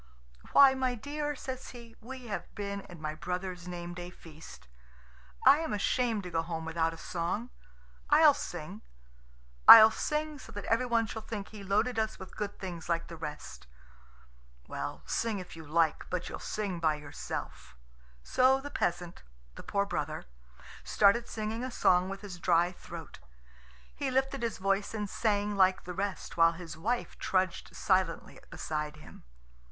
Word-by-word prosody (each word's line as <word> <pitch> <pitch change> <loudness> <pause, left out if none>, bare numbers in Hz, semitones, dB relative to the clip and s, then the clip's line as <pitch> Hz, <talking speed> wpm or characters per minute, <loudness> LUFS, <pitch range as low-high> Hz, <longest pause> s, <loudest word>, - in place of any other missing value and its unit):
"Why, 275 -1 +8
my 260 -1 0
dear" 295 +4 -3
says 260 -1 -6
he, 235 -2 -12
"we 255 +2 -9
have 210 -4 -6
been 200 -1 -4
at 175 - -10
my 155 -1 -4
brother's 180 +2 -4
name 175 -1 -6
day 175 0 -7
feast. 160 - -13 0.8
I 295 - +8
am 320 -6 -2
ashamed 220 +1 0
to 180 - -7
go 165 -1 +1
home 165 -1 -5
without 165 0 0
a 165 - -9
song. 180 +9 -3 0.6
I'll - - +7
sing. - - -6 0.9
I'll 220 -1 +12
sing 300 +2 -2
so 225 - -11
that 205 -1 -6
everyone 230 0 +2
shall 220 0 -6
think 215 -2 -6
he 210 -2 -10
loaded 215 +5 +1
us 220 0 -1
with 190 - -11
good 205 -1 -4
things 175 -3 -7
like 170 -1 -1
the 170 - -7
rest." 70 - -8 1.0
"Well, - - -5
sing 225 -2 -1
if 185 -3 -8
you 160 -2 -10
like; 160 +1 +1
but 180 -1 -3
you'll - - -6
sing 200 -5 -3
by 160 -2 +2
yourself." 145 - -7 0.5
So 260 - +4
the 285 +1 -8
peasant, 175 0 -2 0.3
the - - -10
poor 200 0 0
brother, - - -3 0.6
started 215 +4 +3
singing 220 +2 -3
a 255 - -2
song 185 -6 +3
with 195 0 -6
his 190 -4 -8
dry 175 -1 +3
throat. 185 - -10 0.8
He 280 -2 -2
lifted 265 +1 0
his 230 -2 -2
voice 195 +3 0
and 210 -1 -2
sang 205 0 0
like 190 -1 +4
the 180 - -6
rest, 195 0 -4
while 165 0 +6
his 170 -1 -8
wife 235 +10 -2
trudged 185 -1 -1
silently 185 -4 0
beside 150 -1 -4
him. 150 - -14
195 Hz, 165 wpm, -31 LUFS, 170-230 Hz, 1.0 s, I'll